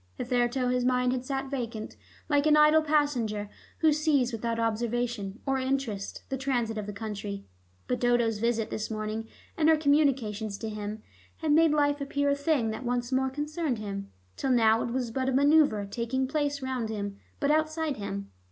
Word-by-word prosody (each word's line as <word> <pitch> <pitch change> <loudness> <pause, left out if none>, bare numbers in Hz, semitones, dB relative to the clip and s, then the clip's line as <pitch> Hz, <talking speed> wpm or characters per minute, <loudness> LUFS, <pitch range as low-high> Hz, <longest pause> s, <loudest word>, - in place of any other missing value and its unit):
Hitherto 245 +1 0
his 250 0 +1
mind 250 0 +2
had 255 -1 -2
sat 270 0 -3
vacant, 230 -5 -4 0.3
like 290 -1 +2
an 300 0 +6
idle 300 +1 +6
passenger 250 -9 0 0.3
who 315 -2 +5
sees 290 -5 +2
without 230 +1 -2
observation 230 -2 -1
or 270 -1 +1
interest 260 -7 -2
the 265 -1 -3
transit 245 -5 0
of 210 - -5
the - - -3
country. 200 -1 -5 0.4
But 250 - -1
Dodo's 240 -3 +2
visit 230 -1 0
this 215 - -3
morning 215 0 -3 0.3
and 315 -1 +3
her 320 - +6
communications 260 -9 +1
to 225 - -5
him 210 0 -5 0.3
had 315 -2 -1
made 320 +2 +6
life 290 -1 +2
appear 285 +1 0
a - - +2
thing 280 -6 +1
that 220 - -6
once 245 0 -1
more 265 0 +2
concerned 295 0 -2
him; 200 -2 -5 0.3
till 270 - -1
now 225 -3 +4
it - - -2
was 245 -1 -2
but 260 +2 -1
a - - 0
manoeuver 285 -6 +4
taking 235 +5 -2
place 285 -1 -1
round 255 -4 -2
him, 200 -2 -4 0.2
but 285 -1 +2
outside 310 -1 0
him. 100 - -5
250 Hz, 180 wpm, -28 LUFS, 220-285 Hz, 0.4 s, an